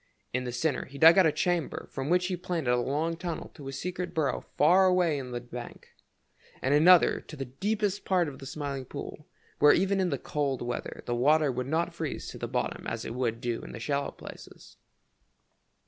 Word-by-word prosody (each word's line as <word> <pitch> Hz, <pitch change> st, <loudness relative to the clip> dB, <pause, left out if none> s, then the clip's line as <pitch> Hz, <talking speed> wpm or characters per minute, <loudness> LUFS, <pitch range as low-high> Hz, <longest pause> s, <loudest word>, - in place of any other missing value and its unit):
In 125 Hz, 0 st, -1 dB
the 125 Hz, -, -3 dB
center 130 Hz, +3 st, -1 dB
he 140 Hz, -, -11 dB
dug 165 Hz, +4 st, +8 dB
out 185 Hz, -, +6 dB
a -, -, +3 dB
chamber 175 Hz, -1 st, -1 dB
from 135 Hz, +1 st, -4 dB
which 180 Hz, +1 st, +3 dB
he 185 Hz, 0 st, -1 dB
planned 175 Hz, -5 st, -3 dB
a 125 Hz, -, +4 dB
long 145 Hz, +7 st, -1 dB
tunnel 170 Hz, -1 st, -5 dB
to 140 Hz, -, -10 dB
his 135 Hz, -, -5 dB
secret 180 Hz, 0 st, -4 dB
burrow 150 Hz, -4 st, 0 dB, 0.2 s
far 185 Hz, +5 st, +6 dB
away 175 Hz, -5 st, +2 dB
in 130 Hz, -2 st, -6 dB
the 120 Hz, -1 st, -3 dB
bank, 120 Hz, 0 st, -9 dB, 0.7 s
and 135 Hz, -, +1 dB
another 170 Hz, +4 st, +6 dB
to 155 Hz, -, -11 dB
the 135 Hz, -2 st, -4 dB
deepest 205 Hz, -, -2 dB
part 180 Hz, -3 st, +2 dB
of 140 Hz, -2 st, -8 dB
the 135 Hz, -, -8 dB
Smiling 140 Hz, -2 st, -4 dB
Pool, 145 Hz, +3 st, -8 dB, 0.3 s
where 145 Hz, 0 st, +7 dB
even 195 Hz, +2 st, +2 dB
in 185 Hz, -2 st, +1 dB
the 140 Hz, -, -1 dB
coldest 135 Hz, -2 st, -2 dB
weather 120 Hz, -, -5 dB
the 120 Hz, -, -2 dB
water 145 Hz, +4 st, +3 dB
would 125 Hz, 0 st, -3 dB
not 165 Hz, +4 st, 0 dB
freeze 160 Hz, -4 st, -4 dB
to -, -, -9 dB
the -, -, -3 dB
bottom -, -, -3 dB
as 115 Hz, 0 st, -4 dB
it -, -, -4 dB
would 120 Hz, -2 st, -1 dB
do 120 Hz, -1 st, -2 dB
in -, -, -9 dB
the -, -, -7 dB
shallow 140 Hz, +3 st, -1 dB
places. -, -, -12 dB
150 Hz, 210 wpm, -29 LUFS, 130-175 Hz, 0.7 s, dug